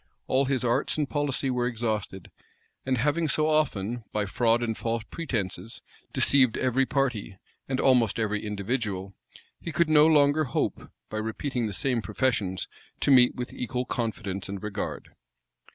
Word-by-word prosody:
All 135 +1 +2
his 130 -1 0
arts 120 +4 +1
and 150 -2 0
policy 140 -2 -1
were 125 -1 0
exhausted; 110 -6 -3 0.6
and 130 -1 +2
having 150 +6 +1
so 155 +2 +2
often, 120 -7 0
by 105 -1 0
fraud 115 +4 +2
and 115 -2 -1
false 115 0 -2
pretences, 110 - -4 0.3
deceived 130 -5 +4
every 130 +1 +1
party, 125 -8 -1 0.3
and 130 -1 -1
almost 125 -5 +3
every 105 -2 -1
individual, 105 -2 -3 0.5
he 170 - -6
could 165 0 +1
no 150 0 +7
longer 150 0 +4
hope, 120 - -2 0.2
by 110 - -3
repeating 115 +3 -2
the - - -4
same 120 +4 0
professions, 105 -4 -1 0.3
to - - +3
meet 125 -2 +6
with 125 0 -5
equal 125 +1 -3
confidence 105 -6 -3
and 100 0 -6
regard. 105 -1 -4
120 Hz, 150 wpm, -27 LUFS, 105-135 Hz, 0.6 s, no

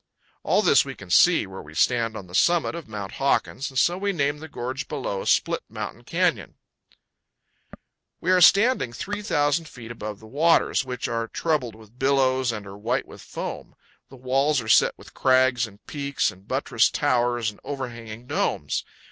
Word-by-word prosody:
All - - +2
this - - +5
we - - -7
can 95 -3 -11
see 175 - +5
where 95 0 -9
we 75 +1 -13
stand 115 +3 +1
on 95 - -8
the 90 - -16
summit 170 - +2
of 170 -2 -7
Mount 105 -3 -6
Hawkins, 135 0 0
and 130 - -8
so 175 +7 +2
we 200 +1 0
name 145 -4 -1
the 160 - -8
gorge 130 -1 -5
below, 125 -9 -4
Split - - +2
Mountain - - -7
Canyon. - - 0 1.6
We 180 - 0
are 185 -1 +4
standing 200 - +5
3,000 165 - -1
feet 120 -6 -10
above 105 -3 -7
the 110 - -14
waters, 150 +5 +2
which 125 -2 -4
are 115 -1 -2
troubled 130 -6 -1
with 110 +2 -18
billows 130 -2 +2
and 105 -2 -6
are 100 +1 -10
white 120 +5 -1
with - - -12
foam. - - -7 0.3
The 135 - -13
walls 135 +3 +1
are 110 - -6
set - - +4
with - - -15
crags 130 -2 +3
and 105 0 -18
peaks 140 -1 -1
and 95 +2 -19
buttressed - - +1
towers 120 -2 +1
and 105 - -20
overhanging 120 -4 -7
domes. - - -1
125 Hz, 175 wpm, -24 LUFS, 110-145 Hz, 1.6 s, this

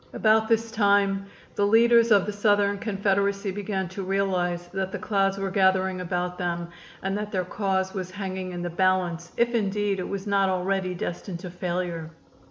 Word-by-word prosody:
About 220 0 +3
this 225 0 +1
time 200 -2 +2 0.3
the 200 - +1
leaders 230 +2 +5
of 205 -4 +5
the 210 - -3
Southern 205 -1 +2
Confederacy 200 -1 0
began 195 -1 -3
to 190 +2 -6
realize 185 -2 -1
that 190 0 -3
the - - -3
clouds 195 -2 0
were 195 -1 -2
gathering 190 -1 +2
about 180 0 -3
them 170 -1 -2 0.3
and 195 +1 -1
that 210 0 -4
their 185 -2 -1
cause 190 -1 -1
was 185 -2 -4
hanging 185 -1 -5
in 175 -1 -5
the 175 - -2
balance, 175 -1 0
if 235 0 +2
indeed 205 -2 0
it 180 - -4
was 200 0 -4
not 200 -2 +2
already 185 0 -1
destined 175 +1 -4
to 180 -2 -7
failure. 175 -2 -3
195 Hz, 180 wpm, -26 LUFS, 185-205 Hz, 0.3 s, leaders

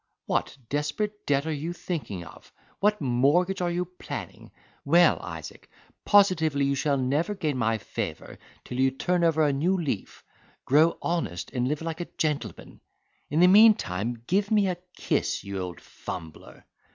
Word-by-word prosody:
What - - -1
desperate 150 - -3
debt 140 0 +2
are 160 - -1
you 155 +4 -4
thinking 150 - -5
of? - - -15 0.3
What 210 -1 +2
mortgage 145 +9 +2
are 175 - +1
you 175 +1 -1
planning? 180 +1 -8 0.3
Well, 170 +5 +5
Isaac, - - -9 0.4
positively 160 -8 +4
you 140 - +1
shall 140 +1 +1
never 145 +10 0
gain 155 -7 -1
my 115 -1 +1
favour - - -6 0.2
till 125 - -6
you 135 0 +4
turn 175 +6 0
over 160 -2 +3
a 145 - +2
new 175 +8 +1
leaf, 140 - -4 0.4
grow 155 +5 +4
honest, 100 - -2
and 125 -1 -1
live 150 +3 -2
like 165 +1 -4
a 175 - -5
gentleman. 150 -3 -3 0.5
In 155 +4 +2
the 180 - +8
meantime 120 - +4
give 200 +6 +1
me 210 -2 +3
a 180 - -2 0.2
kiss, - - -1
you 100 -1 -5
old 90 -2 -5
fumbler." 80 -4 -9
155 Hz, 160 wpm, -26 LUFS, 130-180 Hz, 0.5 s, the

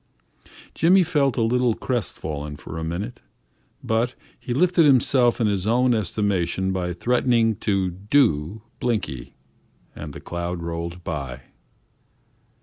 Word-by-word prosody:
Jimmy 180 +4 +5
felt 145 -6 +1
a 115 - +2
little 120 0 +2
crest 120 -6 -3
fallen 75 -1 -5
for 80 - -7
a - - -4
minute, 100 +9 -4 0.6
but 115 +3 0 0.2
he - - -7
lifted 175 +6 +3
himself 130 -3 +4
in 115 - +2
his 100 -2 0
own 125 +2 +3
estimation 95 -3 0
by 90 -1 -2
threatening 115 +3 +2
to 95 -3 0
"do" 100 - +1 0.2
Blinky 100 - -3 0.6
and 75 -1 -7
the - - -8
cloud 85 0 -4
rolled 85 +1 -5
by. 70 -6 -5
105 Hz, 130 wpm, -23 LUFS, 85-125 Hz, 0.6 s, Jimmy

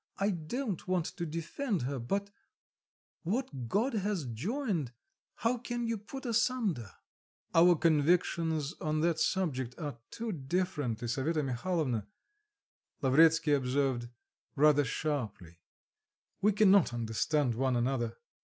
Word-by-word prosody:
I 200 +1 +1
don't 190 - -4
want 180 -3 +1
to 170 -1 -4
defend 170 - -2
her; 135 +1 -2
but 200 +12 -2 0.9
what 170 - -3
God 230 - +1
has 200 -6 -1
joined, 165 - -2 0.4
how 235 +1 0
can 240 0 -3
you 230 0 0
put 265 +7 -9
asunder?" 225 - 0 0.6
"Our 175 +1 +7
convictions 160 -1 +2
on 155 0 0
that 165 -1 +1
subject 145 -8 0
are 145 -7 -5
too 230 -1 -4
different, 145 - -2
Lisaveta 140 +7 0
Mihalovna," 130 - -1 1.0
Lavretsky 155 +3 +5
observed, 130 -2 0 0.5
rather 145 0 +5
sharply; 110 - -3 0.8
"we 210 - +4
cannot 195 - +5
understand 120 +4 0
one 130 +2 +1
another." 120 -1 0
160 Hz, 115 wpm, -31 LUFS, 130-195 Hz, 1.0 s, Our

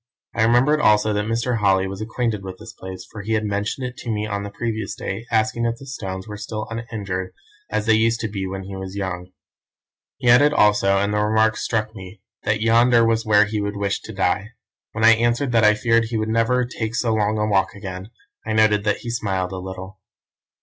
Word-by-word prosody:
"I - - -1
remembered 125 +7 +4
also 105 -2 +4
that 105 0 -1
Mr. 115 +1 0
Holly 95 -2 +3
was 95 +1 -6
acquainted 110 -1 -2
with 95 -1 -7
this 110 +2 -11
place, 95 -1 -9
for 105 - -7
he 110 +3 -2
had 110 -1 0
mentioned 105 +5 -2
it 125 0 -6
to 120 - -7
me 105 -1 -1
on 100 -1 -3
the 100 - -5
previous 110 -1 -4
day, 110 +5 -5
asking 110 +1 +1
if 115 - -1
the 135 - -12
stones 95 -7 -6
were 105 -1 -7
still 110 0 -5
uninjured 100 -5 -4 0.4
as 110 0 -1
they 110 - +4
used 115 +1 +2
to 115 - -1
be 100 -2 -4
when 95 0 -5
he 95 0 -8
was 95 0 -7
young. 90 -2 -4 0.9
He 125 - -3
added 145 +5 +6
also, 105 -4 +4
and 100 +1 0
the 105 - +1
remark 110 +1 +2
struck 110 -1 -2
me, 95 +1 -10 0.3
that 105 0 +1
yonder 115 +1 +4
was 115 -1 +1
where 105 0 +5
he 105 0 -2
would 100 0 -3
wish 100 -1 -1
to - - -9
die. 100 +2 -1 0.4
When 110 0 +1
I 115 - +9
answered 120 +3 +2
that 115 -2 +3
I 105 0 +6
feared 115 +1 +2
he 115 0 -3
would 110 0 -1
never 115 +3 +2
take 115 -2 -4
so 120 -2 +1
long 105 0 +1
a 105 - +1
walk 100 -1 +1
again, 95 -1 -7 0.3
I 110 - -3
noted 105 -1 +3
that 105 - 0
he 120 - -3
smiled 95 -5 -2
a 95 - -5
little. 95 +1 -8
110 Hz, 225 wpm, -22 LUFS, 100-115 Hz, 0.9 s, I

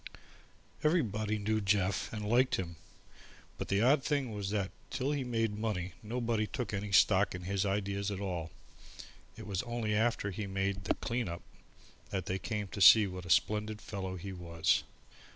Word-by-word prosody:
Everybody 110 - +1
knew 110 +1 0
Jeff 100 -3 +1
and 105 -1 -4
liked 125 +4 +3
him, 85 -2 -4 0.8
but - - -3
the 100 +2 +2
odd 135 +2 +4
thing 140 -5 0
was 100 -2 -3
that 100 -2 -1 0.2
till 135 +2 -1
he 145 -2 -1
made 115 -4 -1
money 95 -5 -2
nobody 115 -1 -1
took 125 -4 -4
any 100 0 -3
stock 95 0 +4
in 90 - -7
his 100 +2 0
ideas 100 0 -1
at 100 -2 -4
all. 90 -5 -3 0.9
It - - -8
was 100 -2 -2
only 120 -3 -2
after 110 -2 +1
he 100 +2 -4
made 95 0 -2
the - - +1
"clean 120 -3 -2
up" 85 - -6 0.7
that 95 -2 -3
they 95 0 -2
came 105 -1 -3
to 100 - -6
see 105 +4 +9
what 90 -2 -6
a - - -9
splendid 105 +4 +2
fellow 95 -3 -5
he 95 +2 -6
was. 85 -2 +1
105 Hz, 175 wpm, -32 LUFS, 95-110 Hz, 0.9 s, see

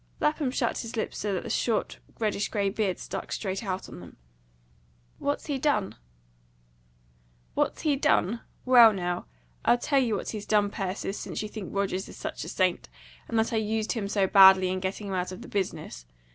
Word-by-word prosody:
Lapham 300 -2 +1
shut 250 -2 -1
his 230 0 -6
lips 220 - -2
so 210 - -1
that 180 - -3
the - - -6
short, 230 -3 0 0.2
reddish 210 -2 -1
grey 200 -2 0
beard 200 -3 -1
stuck - - -6
straight 195 0 -3
out 190 -2 -3
on - - -10
them. 90 -1 -13 1.0
"What's 285 0 -2
he 285 -3 -2
done?" 255 -9 +1 1.6
"What's - - 0
he 295 -3 +2
done? 235 -6 +2 0.2
Well, 240 -4 +8
now, 175 - -3 0.4
I'll 240 - +4
tell 275 +3 +2
you 235 -5 +1
what - - -4
he's 210 -2 -6
done, 205 -1 +3
Persis, 195 +1 -3
since - - -4
you 215 - -5
think 210 -4 -7
Rogers 195 -1 -2
is - - -11
such - - -5
a - - -6
saint, 185 - 0 0.4
and 230 - -2
that 225 +2 +1
I - - +2
used 220 0 -1
him 215 -4 -2
so 200 -1 +2
badly 190 -1 +7
in 185 0 -1
getting 190 +3 -4
him 195 - -4
out 180 0 -1
of 185 - -8
the - - -10
business. 160 - -4
205 Hz, 195 wpm, -27 LUFS, 190-230 Hz, 1.6 s, Well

